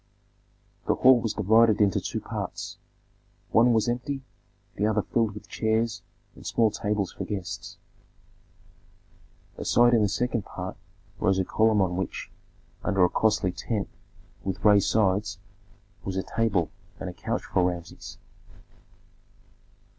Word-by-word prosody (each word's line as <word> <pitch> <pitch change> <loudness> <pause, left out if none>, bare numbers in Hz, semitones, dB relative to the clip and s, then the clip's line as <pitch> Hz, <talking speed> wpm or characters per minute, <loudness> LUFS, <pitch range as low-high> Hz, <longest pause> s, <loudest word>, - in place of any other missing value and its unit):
The - - +3
hall 130 -1 +6
was 115 -2 -2
divided 110 +1 +4
into 100 -3 +3
two - - -4
parts: - - -5 0.7
one 120 +2 +5
was 110 -1 +2
empty, 135 +3 -2 0.5
the 105 - +1
other 110 -1 +1
filled 115 -4 0
with 105 0 -10
chairs 110 0 0 0.3
and - - -14
small 115 -2 +2
tables 105 -2 -1
for - - -5
guests. 95 -4 -5 1.8
Aside 120 0 +4
in 115 - +5
the 105 - +2
second 120 0 -1
part - - -6 0.4
rose 95 0 +2
a 95 - +2
platform 110 0 +3
on 90 -2 0
which, 95 - -4 0.5
under 95 -3 +3
a - - +1
costly 105 -3 +2
tent 105 +2 -3 0.5
with 95 +1 -4
raised 105 -2 +6
sides, 100 -2 +1 0.7
was 95 -1 -3
a 95 - 0
table 105 -7 0 0.3
and - - -5
a - - -5
couch - - -3
for 90 - +1
Rameses. 85 -1 -8
105 Hz, 135 wpm, -26 LUFS, 95-115 Hz, 1.8 s, hall